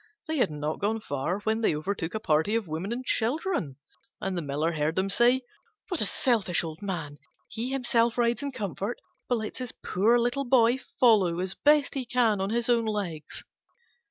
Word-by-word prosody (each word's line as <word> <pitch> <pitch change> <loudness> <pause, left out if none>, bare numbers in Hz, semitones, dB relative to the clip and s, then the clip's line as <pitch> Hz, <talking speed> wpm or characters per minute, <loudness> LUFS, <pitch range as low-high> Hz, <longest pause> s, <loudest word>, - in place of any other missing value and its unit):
They 315 -2 -2
had 245 - +3
not 150 +1 -3
gone 215 +2 0
far 170 +1 -3
when 220 +2 0
they 215 - +2
overtook 175 +3 -3
a - - -1
party 160 +3 +1
of 225 -5 -1
women 165 +7 -4
and 250 +2 -4
children, 245 - -1 0.4
and 195 -1 -2
the 175 - -1
Miller 150 +2 -1
heard 155 0 -1
them 190 +1 +1
say, 245 +5 +4 0.5
"What 360 - -1
a 210 - +1
selfish 210 -10 +1
old 160 -1 -7
man! 160 -8 -4 0.3
He 235 +3 -4
himself 240 -3 +2
rides 240 +1 +2
in 285 0 -3
comfort, 205 - -4 0.3
but 245 - +2
lets 220 +2 -5
his 250 -2 -4
poor 220 +6 +3
little 245 +4 0
boy 245 0 +4 0.2
follow 200 -8 +4
as 185 +1 -2
best 295 -1 +3
he 270 - -2
can 235 -5 +2
on 195 - -1
his 235 +1 0
own 235 -2 +3
legs!" 195 -8 -3
215 Hz, 190 wpm, -27 LUFS, 170-240 Hz, 0.5 s, say